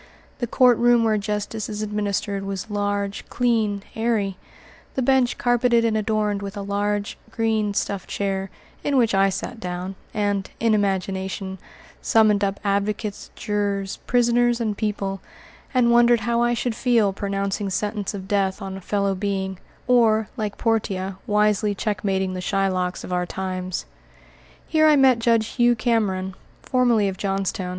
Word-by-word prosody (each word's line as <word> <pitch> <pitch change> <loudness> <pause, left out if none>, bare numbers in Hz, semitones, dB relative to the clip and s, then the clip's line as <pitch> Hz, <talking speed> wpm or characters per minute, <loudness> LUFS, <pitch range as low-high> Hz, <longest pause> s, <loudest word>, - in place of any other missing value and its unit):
The 240 - -1
courtroom 240 -1 +4
where 215 -2 +2
justice 210 +1 -3
is 210 0 -3
administered 205 -1 -2
was 195 +2 -5
large, 205 -1 -2
clean, 220 -5 +1
airy 220 -4 0 0.6
the 260 - 0
bench 260 -1 +3
carpeted 245 -1 +3
and 225 -1 +1
adorned 210 -1 0
with 200 0 -6
a 200 - -4
large, 205 +1 -2
green, 220 -2 0
stuffed 200 -2 -2
chair, 195 -1 -2 0.3
in 285 -2 +1
which 230 -3 +3
I 195 0 +4
sat 225 +5 -5
down, 180 -1 -4 0.2
and, 205 -2 -1
in 225 -1 +2
imagination, 190 -1 -1 0.4
summoned 215 -2 +4
up 195 0 -1
advocates, 205 +1 -2
jurors, 205 -3 -2
prisoners, 240 0 +3
and 220 -3 -1
people, 200 -2 -2 0.5
and 250 -3 +3
wondered 240 -1 +5
how 235 +2 +1
I 240 0 +2
should 235 0 -1
feel 225 -5 +2
pronouncing 200 0 -2
sentence 205 +1 -2
of 190 -1 -7
death 195 -1 0
on 190 -2 -6
a - - -9
fellow 200 +1 0
being, 190 -1 -3 0.3
or, 225 -3 +3
like 215 -4 -3
Portia, 195 -4 -1
wisely 210 0 +2
checkmating 190 -2 -1
the 185 - -4
Shylocks 185 -2 -1
of 180 - -5
our 180 0 0
times. 185 0 -4 0.8
Here 310 -1 +4
I 305 - +6
met 265 -4 +5
Judge 230 -1 +3
Hugh 240 -1 +3
Cameron, 210 -5 0 0.3
formerly 240 -5 +2
of 190 -1 -3
Johnstown. 195 -1 -2
205 Hz, 150 wpm, -23 LUFS, 195-230 Hz, 0.8 s, I